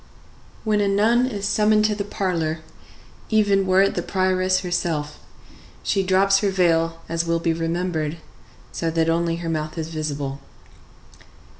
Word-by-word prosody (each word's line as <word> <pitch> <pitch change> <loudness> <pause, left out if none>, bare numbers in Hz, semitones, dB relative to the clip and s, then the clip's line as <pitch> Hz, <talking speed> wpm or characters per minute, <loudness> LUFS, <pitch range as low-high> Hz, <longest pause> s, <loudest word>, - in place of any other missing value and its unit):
When 215 -2 +1
a 200 - +2
nun 225 +5 +3
is 205 -5 -4
summoned 215 0 +3
to 215 - +2
the 205 -1 -3
parlor, 170 -6 -2 0.7
even 205 -3 +3
were 185 +1 +5
it 195 - +1
the - - -2
prioress 185 -1 +1
herself, 165 -5 -2 0.6
she 195 - +1
drops 195 +1 +3
her 205 - +1
veil, 165 -3 +1
as 165 +1 -1
will 170 0 +2
be 165 0 0
remembered, 165 -1 -2 0.5
so 165 - -2
that 165 0 +1
only 165 0 0
her 170 0 -5
mouth 155 0 -3
is 160 0 -3
visible. 145 -3 -4
180 Hz, 150 wpm, -22 LUFS, 165-195 Hz, 0.7 s, were